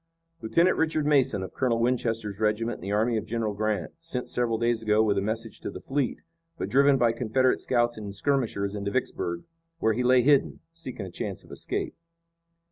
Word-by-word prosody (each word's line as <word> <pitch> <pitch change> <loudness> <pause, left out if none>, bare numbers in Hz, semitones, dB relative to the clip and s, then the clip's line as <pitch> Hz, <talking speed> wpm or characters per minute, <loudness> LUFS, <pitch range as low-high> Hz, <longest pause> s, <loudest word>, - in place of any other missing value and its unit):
"Lieutenant 170 +11 +3
Richard 155 -2 +1
Mason 135 -9 +3
of 95 - -7
Colonel 125 -3 +1
Winchester's 115 -4 -1
regiment 110 +2 0
in - - -17
the 100 +3 -4
army 110 +3 +2
of 110 - -4
General 110 -2 -1
Grant, 105 -5 -1
sent 165 -7 -5
several 120 -2 +1
days 115 0 +1
ago 110 0 +3
with 105 -2 +2
a 100 - +1
message 110 +2 -3
to - - -5
the - - -7
fleet, 135 +6 -1 0.4
but - - -3
driven 140 +1 +5
by 120 -2 +3
Confederate 125 +2 +1
scouts 120 -2 +1
and 100 -2 -6
skirmishers 110 -5 0
into 100 -1 -3
Vicksburg, 85 -7 -2 0.3
where 110 -9 +2
he 120 - -1
lay 125 0 +5
hidden, 140 +1 +3
seeking 130 -11 -7
a 95 - -8
chance - - -5
of - - -17
escape." - - -3
115 Hz, 195 wpm, -27 LUFS, 105-130 Hz, 0.4 s, driven